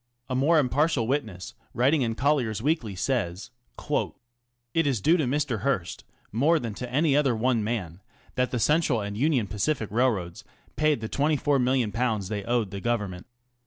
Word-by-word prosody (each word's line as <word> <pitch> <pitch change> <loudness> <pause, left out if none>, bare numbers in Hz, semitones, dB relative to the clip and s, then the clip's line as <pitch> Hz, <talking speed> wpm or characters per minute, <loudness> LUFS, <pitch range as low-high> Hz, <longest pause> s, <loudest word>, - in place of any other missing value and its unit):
A - - 0
more 150 +6 +3
impartial 145 -1 +2
witness, 110 -9 -3 0.2
writing 135 +5 +3
in 115 -3 -1
Colliers 130 -6 +1
Weekly, 120 - -1
says: 100 -2 -2 0.3
ŌĆö - - -2 0.6
It 165 -2 +2
is 130 -6 +1
due 160 - +4
to 155 -5 +1
Mr. 130 -3 -1
Hearst, 100 -7 -2 0.3
"more 145 +10 +3
than 115 -7 -4
to 125 +3 -7
any 145 +2 +2
other 140 -5 +3
one 115 0 +1
man, 100 -6 -4 0.3
that 125 0 0
the 125 - -2
Central 150 0 +2
and 100 -1 -4
Union 130 -1 +1
Pacific 110 +3 -2
Railroads 110 -8 0 0.3
paid 150 -5 +1
the 110 - -4
^24,000,000 125 -7 +1
they 105 -2 -3
owed 120 -5 0
the 100 - -6
Government. 105 -5 -2
125 Hz, 165 wpm, -26 LUFS, 105-145 Hz, 0.6 s, due